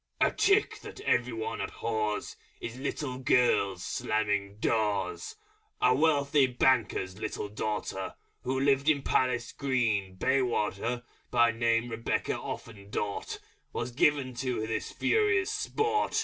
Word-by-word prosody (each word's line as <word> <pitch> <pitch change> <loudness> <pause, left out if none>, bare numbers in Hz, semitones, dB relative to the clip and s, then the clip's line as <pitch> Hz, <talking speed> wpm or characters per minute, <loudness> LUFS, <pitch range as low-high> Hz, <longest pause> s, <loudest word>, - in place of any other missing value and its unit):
_ - - +6
A - - -1
Trick 405 +1 +2
that - - -10
everyone 120 - 0
abhors 105 -1 -2 0.2
In 120 +3 -6
Little 130 -2 -3
Girls 125 -6 +3
is - - -5
slamming 105 -2 -1
Doors. 105 - -1 0.4
A 125 - +5
Wealthy 145 -1 +3
Banker's 115 -7 +1
Little 105 -1 -3
Daughter 105 -2 -3 0.3
Who 130 +1 -1
lived 140 +1 +3
in 140 -3 +2
Palace 125 -2 +1
Green, 115 -9 0
Bayswater 120 -1 0 0.3
(By 120 -1 +4
name 115 +1 +1
Rebecca 115 0 -1
Offendort), 100 -2 -5 0.4
Was 120 +1 -3
given 135 0 +2
to 120 -4 -1
this 115 - -3
Furious 425 -2 +2
Sport. 435 0 0
120 Hz, 120 wpm, -29 LUFS, 110-135 Hz, 0.4 s, _